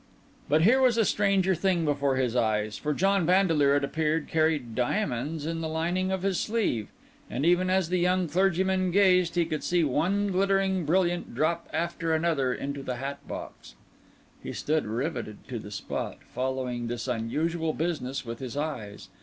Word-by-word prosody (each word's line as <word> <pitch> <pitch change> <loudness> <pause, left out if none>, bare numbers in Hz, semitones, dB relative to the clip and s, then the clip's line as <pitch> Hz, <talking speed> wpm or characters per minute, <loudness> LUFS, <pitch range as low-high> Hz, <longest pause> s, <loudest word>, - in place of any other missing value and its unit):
But 155 +2 +4
here 255 +8 +5
was 250 -3 +4
a 225 - +4
stranger 195 -2 +2
thing 175 -1 +1
before 140 -2 +1
his 125 -2 0
eyes; 105 -3 +1
for 150 - -2
John 195 +4 +2
Vandeleur, 165 -6 +3
it 145 - +1
appeared, 155 +2 0
carried 155 -7 +1
diamonds 145 - -1
in 165 0 -3
the 160 - -2
lining 175 +4 -1
of 190 -1 -2
his 195 -2 +1
sleeve; 210 - -1 0.4
and 140 - -2
even 180 +2 +3
as 185 -3 +2
the 180 0 +1
young 180 0 +2
clergyman 190 +1 +1
gazed, 180 -2 +4
he 170 -1 +3
could 155 -2 -3
see 175 -1 +2
one 180 +9 +1
glittering 190 -1 +1
brilliant 175 -3 0
drop 155 +6 0
after 165 -1 -1
another 155 -6 +1
into 140 +2 -4
the 130 -2 -4
hat 140 +3 -5
box. - - -8 0.7
He - - -6
stood 155 -4 -1
riveted 120 -2 -4
to 120 -3 -4
the 105 - -9
spot, 100 - -4 0.2
following 125 -2 -2
this 120 +1 -4
unusual 155 +8 -1
business 145 -6 -3
with 115 0 -6
his 130 +1 -6
eyes. 125 -9 -5
160 Hz, 170 wpm, -27 LUFS, 135-185 Hz, 0.7 s, here